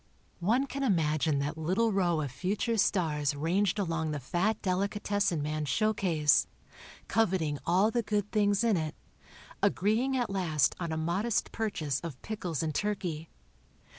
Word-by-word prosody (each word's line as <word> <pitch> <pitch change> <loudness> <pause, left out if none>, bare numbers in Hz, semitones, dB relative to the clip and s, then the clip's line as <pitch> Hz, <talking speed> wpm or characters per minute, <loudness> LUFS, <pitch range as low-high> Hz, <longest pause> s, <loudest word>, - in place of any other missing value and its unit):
One 230 +10 +2
can 275 0 -5
imagine 155 - +1
that 145 +3 -2
little 190 +8 +1
row 175 -5 +2
of 140 -4 -4
future 195 - -1
stars 155 -9 +1
ranged 180 +7 +1
along 165 -5 -1
the 150 -1 -2
fat 175 - 0
delicatessen 200 -3 0
man's 150 -1 -2
showcase, 175 -10 +2 0.6
coveting 180 -9 +1
all 190 +6 +3
the 240 - +1
good 210 -1 -2
things 205 0 +2
in 225 -5 +3
it, 155 -2 -3 0.7
agreeing 235 +7 +2
at 240 -5 -1
last 160 -9 +1
on 170 -2 -3
a 160 - -2
modest 190 +7 0
purchase 160 - -2
of 160 -6 -7
pickles 180 -8 -3
and 155 -1 -2
turkey. 175 -6 -2
180 Hz, 145 wpm, -30 LUFS, 155-210 Hz, 0.7 s, all